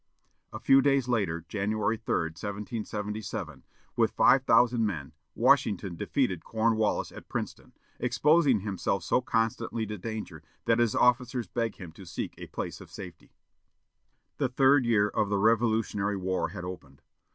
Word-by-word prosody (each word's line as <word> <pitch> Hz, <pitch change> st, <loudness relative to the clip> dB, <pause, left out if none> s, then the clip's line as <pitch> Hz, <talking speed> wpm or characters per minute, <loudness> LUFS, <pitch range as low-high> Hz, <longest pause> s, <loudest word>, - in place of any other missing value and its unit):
A -, -, -7 dB
few 135 Hz, 0 st, +5 dB
days 135 Hz, -2 st, +2 dB
later, 95 Hz, -9 st, -1 dB
January 105 Hz, +3 st, -1 dB
3, 80 Hz, -6 st, -1 dB
1777, 105 Hz, -, -5 dB, 0.3 s
with -, -, +3 dB
five 135 Hz, -, +4 dB
thousand 120 Hz, -3 st, +4 dB
men, 80 Hz, -9 st, -3 dB, 0.2 s
Washington 95 Hz, -3 st, +2 dB
defeated 95 Hz, -, -1 dB
Cornwallis 110 Hz, -1 st, 0 dB
at -, -, -12 dB
Princeton, -, -, -5 dB, 0.3 s
exposing 135 Hz, -, +3 dB
himself 95 Hz, -2 st, -2 dB
so 125 Hz, -, +2 dB
constantly 115 Hz, -1 st, -1 dB
to 105 Hz, -1 st, -6 dB
danger 110 Hz, +2 st, -6 dB, 0.2 s
that 115 Hz, 0 st, +3 dB
his 120 Hz, -3 st, +2 dB
officers 125 Hz, 0 st, +2 dB
begged 115 Hz, -3 st, -2 dB
him 90 Hz, -4 st, -10 dB
to 95 Hz, +4 st, -13 dB
seek 85 Hz, -, -5 dB
a -, -, -8 dB
place -, -, -6 dB
of -, -, -12 dB
safety. -, -, -11 dB, 1.0 s
The 135 Hz, -3 st, 0 dB
third 135 Hz, +1 st, +4 dB
year 105 Hz, -3 st, +3 dB
of 105 Hz, 0 st, -1 dB
the 100 Hz, -, +1 dB
Revolutionary 110 Hz, -2 st, +1 dB
War 95 Hz, 0 st, -1 dB
had 90 Hz, -3 st, -7 dB
opened. 75 Hz, -7 st, -9 dB
110 Hz, 145 wpm, -28 LUFS, 95-120 Hz, 1.0 s, few